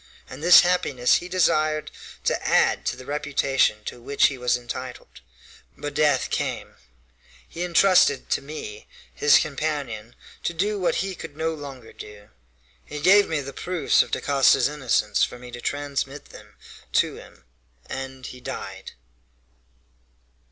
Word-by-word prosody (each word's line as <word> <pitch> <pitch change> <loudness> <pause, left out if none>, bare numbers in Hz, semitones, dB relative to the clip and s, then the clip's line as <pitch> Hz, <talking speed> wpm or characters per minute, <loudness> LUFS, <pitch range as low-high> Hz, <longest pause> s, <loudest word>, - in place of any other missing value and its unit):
And 130 +3 -10
this 175 +2 +9
happiness 145 -9 +2
he 180 - -7
desired 155 -4 +1 0.3
to - - 0
add - - +2
to - - 0
the 130 - -11
reputation 140 -6 0
to 120 - -7
which 140 +4 +3
he 135 - -7
was 125 0 +1
entitled. 125 - -8 0.6
But 145 0 -5
death 145 -3 +2
came - - -3 0.7
he 170 - -8
intrusted 175 -5 +4
to - - +1
me, 135 -8 -8 0.3
his 145 - +5
companion, 140 -7 -3 0.3
to 170 - -3
do 205 +4 -1
what 180 - +1
he 195 - -4
could 150 -4 -10
no 160 +1 -1
longer 135 -6 -10
do. 105 -1 -12 0.5
He 150 - -7
gave 195 +6 +5
me 155 -3 -1
the 140 0 -8
proofs 175 0 +1
of - - -3
Dacosta's 140 -1 +3
innocence 125 -8 0
for - - -2
me 125 0 -11
to 120 0 -8
transmit 145 0 -4
them 105 -1 -15 0.4
to - - +1
him, - - -15 0.4
and 135 -1 -7
he 125 0 -9
died." - - -7
140 Hz, 145 wpm, -24 LUFS, 125-155 Hz, 0.7 s, this